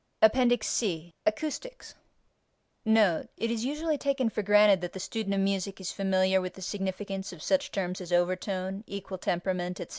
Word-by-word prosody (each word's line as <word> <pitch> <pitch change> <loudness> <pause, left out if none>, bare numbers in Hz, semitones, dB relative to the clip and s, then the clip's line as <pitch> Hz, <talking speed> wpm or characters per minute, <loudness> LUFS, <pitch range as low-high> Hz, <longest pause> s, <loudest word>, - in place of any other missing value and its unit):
APPENDIX 245 0 +5
C 175 -6 -1
ACOUSTICS 310 - -3 0.9
NOTE: 215 -7 +3
It 230 +3 -1
is 230 -1 -1
usually 300 +2 -1
taken 275 -4 +1
for 215 - -1
granted 205 -1 +5
that 175 - -4
the 190 - -6
student 200 0 -2
of 195 - +1
music 195 0 -1
is 190 - -4
familiar 190 -1 +2
with 185 0 -5
the 190 - -11
significance 195 0 -3
of 175 -4 -10
such 280 0 +1
terms 185 -1 -2
as 180 -1 -8
over 175 +1 +3
tone, 190 +1 -4
equal 195 -1 -6
temperament, 180 0 -2
etc. - - -6
195 Hz, 175 wpm, -29 LUFS, 185-220 Hz, 0.9 s, APPENDIX